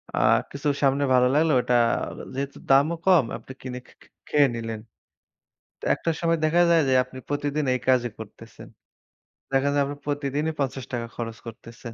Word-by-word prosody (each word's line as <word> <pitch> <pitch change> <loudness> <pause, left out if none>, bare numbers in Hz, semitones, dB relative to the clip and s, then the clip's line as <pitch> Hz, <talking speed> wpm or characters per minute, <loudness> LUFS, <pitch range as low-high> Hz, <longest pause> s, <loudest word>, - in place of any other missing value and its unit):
আ - - -5 0.3
কিছু 140 +2 -4 0.2
সামনে 140 +1 +3
ভালো 125 0 +5
লাগলো 155 +2 +3
ওইটা 125 0 +1 0.6
যেহেতু 140 +1 -4
দামও 140 +5 +4
কম 180 -8 +5
আপনি - - -13
কিনে 125 -1 -6
খে - - -20
খে - - -19 0.2
খেয়ে 145 -2 +4
নিলেন। 115 -1 -5 1.1
একটা - - -3
সময় 165 -1 +2
দেখা 170 +3 +3
যায় 165 -1 +5
যে 130 - +3
আপনি 130 +1 -13
প্রতিদিন 145 +1 -1
এই 125 - -1
কাজে 125 -2 +3
করতেছেন। - - -11 0.9
দেখা 135 +1 +2
যায় 145 - +2
আপনা 145 +1 -6
প্রতিদিনই 145 +1 -1
৳৫০ 130 -3 -3
খরচ 115 -1 -5
করতেছেন। 115 +1 -10
140 Hz, 160 wpm, -25 LUFS, 125-150 Hz, 1.1 s, ভালো